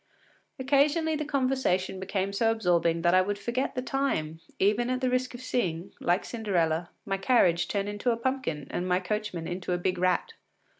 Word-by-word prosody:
Occasionally 290 +4 +2
the 305 0 -2
conversation 255 -10 0
became 195 +1 -2
so 225 +3 +2
absorbing 170 -6 +1
that 175 0 +4
I 185 - +6
would 205 +2 -2
forget 235 +6 -2
the 255 - -2
time, 160 - -1 0.2
even 215 +5 +2
at 255 0 0
the 255 -1 0
risk 255 0 0
of 245 - -8
seeing, 190 -8 -2
like 175 +3 +1
Cinderella, 175 -7 0 0.2
my 195 -1 -1
carriage 190 -5 +3
turn 200 -1 -1
into 205 +4 -1
a 230 - +1
pumpkin 245 - -2
and 180 - -2
my 180 0 +2
coachman 190 -3 -3
into 180 0 -3
a - - +1
big 180 0 -1
rat. 185 - +1
200 Hz, 185 wpm, -28 LUFS, 180-255 Hz, 0.2 s, I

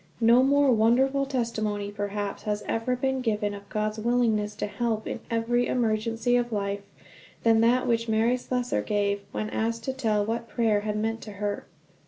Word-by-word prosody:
No 235 +2 +6
more 280 +1 +4
wonderful 260 +5 +3
testimony, 215 -6 -2
perhaps, 205 0 -4
has 210 -1 -2
ever 230 +3 0
been 265 +1 -1
given 210 -3 0
of 200 0 -10
God's 215 0 -2
willingness 220 -3 +1
to - - -2
help 220 0 -2
in - - -4
every 240 +1 +1
emergency 230 0 0
of 240 -1 -1
life, 200 -1 -2 0.6
than 225 -1 +5
that 245 +2 +3
which 230 -1 0
Mary 225 +3 +3
Slessor 250 0 -1
gave, 205 -1 0
when 215 +1 -3
asked 230 +1 -1
to 265 - -2
tell 215 -6 0
what 230 +1 -3
prayer 225 -3 +2
had 210 0 -3
meant 225 +1 -2
to 210 - -8
her. 205 0 -3
225 Hz, 175 wpm, -27 LUFS, 210-245 Hz, 0.6 s, No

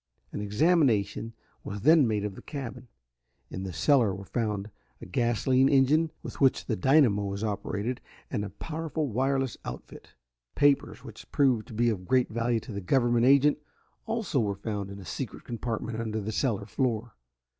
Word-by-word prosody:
An - - -4
examination 115 - +2 0.3
was 105 0 -6
then 155 +1 +6
made 105 -2 0
of 105 - -4
the - - -11
cabin. 130 -4 -7 0.6
In 95 - -5
the 95 -1 -4
cellar 110 - +3
were 100 +1 -9
found 105 -2 -2 0.3
a - - -9
gasoline 130 +2 +2
engine 145 +4 +4
with - - -8
which 135 -2 +3
the 110 - -1
dynamo 120 -3 +4
was 100 +1 -4
operated, 105 +3 -3 0.3
and 100 - -1
a 105 - -4
powerful 155 - -4
wireless 135 +1 0
outfit. - - -9 0.4
Papers 145 -1 +2
which - - -12
proved 130 -6 +2
to 110 - -10
be 120 +2 +3
of 90 -4 -5
great 130 -1 +3
value 115 +1 0
to 125 - -10
the 100 -1 -4
government 120 +4 +2
agent 140 +2 +5 0.5
also 220 - -1
were 100 -4 0
found 100 -1 -4
in 100 - -8
a 100 - -10
secret 75 - -5
compartment 115 -1 -4
under 110 -1 -2
the 105 +1 -4
cellar 110 -4 -1
floor. 115 0 -2
115 Hz, 170 wpm, -28 LUFS, 105-135 Hz, 0.6 s, then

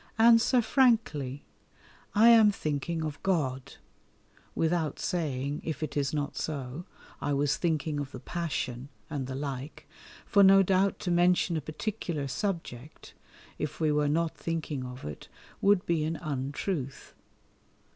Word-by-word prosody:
answer 230 +2 +5
frankly, 220 - +1 0.7
"I 225 +3 +7
am 225 -2 +8
thinking 160 -2 -2
of 155 -2 -5
God," 140 -8 -1 0.8
without 160 -2 0
saying 145 -4 -2
(if 155 -1 -4
it 155 - -4
is 140 -1 0
not 145 -2 -2
so), 140 +2 -4 0.4
I 145 - 0
was 145 0 +1
thinking 155 -3 -1
of 140 -1 -5
the 130 - -8
Passion, 135 -4 -4 0.2
and 140 -4 -3
the 130 - -5
like, 135 0 -6 0.4
for 200 - +4
no 195 0 +7
doubt 190 +1 +2
to 180 - -1
mention 175 0 +3
a 160 - -1
particular 155 -1 -4
subject 155 - -5 0.5
(if - - -4
we 155 -2 +2
were 150 0 +2
not 165 +2 0
thinking 155 -5 -3
of 125 0 -8
it) 75 -1 -8 0.3
would 200 -2 +4
be 165 -3 +1
an 160 +2 -1
untruth. 140 0 -4
155 Hz, 140 wpm, -29 LUFS, 140-180 Hz, 0.8 s, am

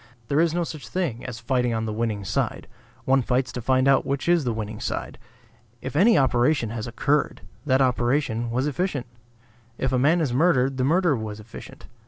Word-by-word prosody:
There 145 - +2
is 165 0 +3
no 175 +1 0
such 155 -7 -7
thing 145 -7 -3
as 120 -3 -6
fighting 125 -1 0
on 110 0 -2
the 110 - -3
winning 110 -3 -2
side; - - -2 0.4
one 135 0 +3
fights 130 +1 0
to 125 - -5
find 130 +2 +2
out 135 -1 +4
which 140 +3 -3
is 170 -4 +3
the 120 - 0
winning 110 -1 -5
side. - - -4 0.6
If 130 +3 -7
any 215 +8 +5
operation 125 -2 +2
has 115 -1 -5
occurred, 145 +5 0 0.3
that 130 0 +3
operation 120 -2 0
was 125 +3 -1
efficient. 150 -2 -2 0.7
If 130 - -1
a 130 - +2
man 155 +7 +3
is 145 -7 0
murdered, 135 -3 +2
the 130 - 0
murder 165 +2 +3
was 110 -2 -5
efficient. 105 +1 -12
130 Hz, 195 wpm, -24 LUFS, 115-150 Hz, 0.7 s, any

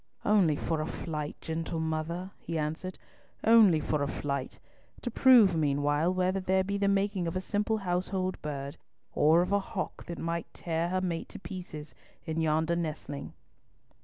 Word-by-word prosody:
"Only 195 -8 +4
for 160 +1 -1
a 155 - -3
flight, 150 -3 -4
gentle 165 +1 -3
mother," 160 +4 -2
he 165 - -4
answered, 160 +4 -3 0.5
"only 220 -8 +7
for 150 0 -1
a 140 - +1
flight, 140 -2 -3 0.5
to 245 - -2
prove 230 -8 +6
meanwhile 145 +2 +2
whether 185 +1 +1
there 190 0 +2
be 200 +1 -2
the 200 - +2
making 200 -2 +1
of 165 - -3
a - - +1
simple 210 +3 0
household 185 0 -1
bird, 140 0 -5 0.4
or 160 +3 +5
of 180 - -4
a 200 - +4
hawk 195 -1 -5
that 170 -1 -6
might 170 0 -3
tear 165 0 -1
her 185 +1 0
mate 170 -3 -3
to 210 - -9
pieces, 160 -7 -8 0.3
in 160 0 -1
yonder 160 +2 +2
nestling." 155 -4 -4
170 Hz, 165 wpm, -30 LUFS, 155-190 Hz, 0.5 s, only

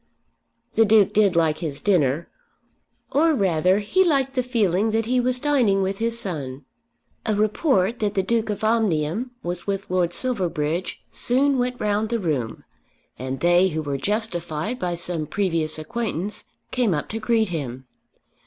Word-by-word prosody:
The 225 - +5
Duke 215 -2 +4
did 200 -4 +3
like 160 -2 +2
his 150 -5 -4
dinner, 165 -5 +1 0.8
or 315 +2 +3
rather 185 - +2
he 210 - +2
liked 275 -6 +1
the 255 - +1
feeling 220 -5 +1
that 225 0 0
he 250 +2 +1
was 250 0 +2
dining 245 -9 +2
with 195 +1 -2
his 230 0 0
son. 145 - -5 0.6
A 215 - 0
report 215 - +1
that 210 -1 -1
the 190 - +2
Duke 225 +2 0
of 210 0 -3
Omnium 215 -1 +1
was 175 +2 -4
with 195 -1 -3
Lord 180 -2 +1
Silverbridge 175 -7 -2
soon 270 +2 +2
went 245 0 -1
round 210 +1 0
the 235 - 0
room, 145 - -2 0.6
and 130 +1 -4
they 175 +2 +5
who 160 -3 -3
were 140 -2 -2
justified 205 - -2
by 175 -6 -1
some 170 -2 -1
previous 165 -6 0
acquaintance 205 +3 -4 0.3
came 235 -9 +1
up 150 - -3
to 225 - -3
greet 220 -2 +1
him. 130 -6 -5
200 Hz, 160 wpm, -23 LUFS, 165-230 Hz, 0.8 s, The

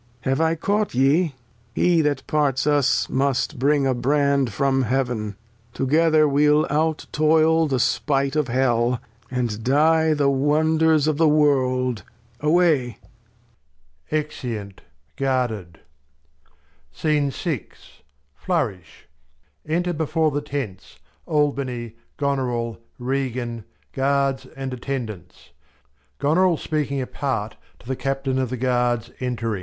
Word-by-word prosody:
Have 135 +4 0
I 160 0 +2
caught 205 - -1
ye? 140 +4 +2 0.4
He 175 -2 +3
that 145 -3 -1
parts 145 -3 +1
us 145 -3 +2
must 135 +1 0
bring 140 +1 +2
a 130 - +2
Brand 140 0 +1
from 135 +4 +1
Heav'n: 120 -4 -1 0.4
Together 155 +3 +3
we'll 150 +2 +3
out 155 +1 0
toil 160 +1 +3
the 130 -3 0
Spight 135 +3 0
of 150 -3 +1
Hell, 120 -1 +1 0.3
And 120 -4 -2
die 155 +4 +3
the 145 -1 +2
Wonders 155 +2 +3
of 155 -2 +1
the 160 0 +4
World; 130 -5 +2 0.4
away. 150 -6 +2 1.1
\Exeuni 125 -9 -3 0.4
guarded. 120 -11 -2 1.1
Flourish. 95 - -3 0.8
Enter 175 +3 0
before 160 0 0
the 145 +1 -2
Tents, 140 -10 -6 0.3
Albany, 135 -6 -1 0.2
Goneril, 125 -5 -1 0.2
Regan, 125 -3 -3 0.3
Guards 135 -1 0
and 135 -1 -4
Attendants; 120 - -6 0.7
Goneril 170 +4 +2
speaking 145 -3 -2
apart 125 -4 -3 0.2
to 120 - -18
the 130 - -1
Captain 135 0 -2
of 130 -2 -1
the 130 - -4
Guards 120 -2 0
entring. 115 -5 -2
135 Hz, 105 wpm, -23 LUFS, 125-150 Hz, 1.1 s, the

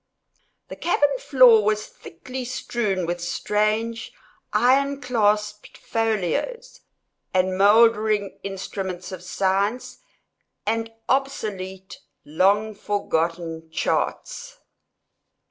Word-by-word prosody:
The - - -7
cabin 290 -5 +1
floor 250 -6 +6
was 215 0 0
thickly 255 +10 -9
strewn 215 -6 -2
with 175 +1 -3
strange, 215 +5 -1 0.4
iron 275 +3 +3
clasped 210 -4 0
folios, 225 - -2 0.5
and 185 0 +2
mouldering 210 0 +3
instruments 190 -2 -5
of 185 -2 -7
science, 195 +6 -1 0.7
and 225 +1 -1 0.2
obsolete 195 -8 -3 0.3
long 200 +7 +2
forgotten 165 -5 -2
charts. - - -2
210 Hz, 80 wpm, -23 LUFS, 190-235 Hz, 0.7 s, floor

